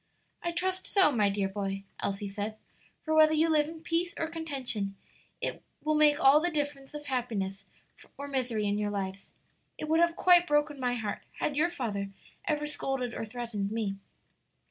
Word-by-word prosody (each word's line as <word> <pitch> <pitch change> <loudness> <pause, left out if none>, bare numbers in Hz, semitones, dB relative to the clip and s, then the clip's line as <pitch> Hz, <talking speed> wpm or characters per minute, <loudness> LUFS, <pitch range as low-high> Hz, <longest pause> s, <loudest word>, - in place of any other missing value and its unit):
"I 345 - -1
trust 370 +2 -1
so, 380 -7 +5
my 210 -6 +3
dear 200 -1 0
boy," 195 0 -3 0.2
Elsie 200 +1 -2
said, 205 +2 -4 0.5
"for 315 - -1
whether 315 0 +6
you 320 +1 +3
live 300 -1 +3
in 320 -1 -9
peace 340 +1 0
or - - 0
contention, 265 -11 -3 0.9
will 310 - +2
make 300 -1 +5
all 275 +2 +7
the 350 +3 +1
difference 290 -3 -3
of 295 0 -6
happiness 225 -8 -2 0.5
or 285 - -5
misery 250 -6 0
in 205 0 +1
your 210 0 0
lives. 195 -1 -4 0.5
It 310 - -4
would 320 +1 +3
have 340 0 +4
quite 355 -1 +6
broken 295 -1 +2
my 250 -1 0
heart 215 -4 -3 0.2
had 290 - -1
your 320 +4 +3
father 215 - -3 0.4
ever 300 -1 0
scolded 270 -4 -2
or - - -4
threatened 220 -3 -3
me." 215 -3 -1
270 Hz, 175 wpm, -30 LUFS, 210-310 Hz, 0.9 s, all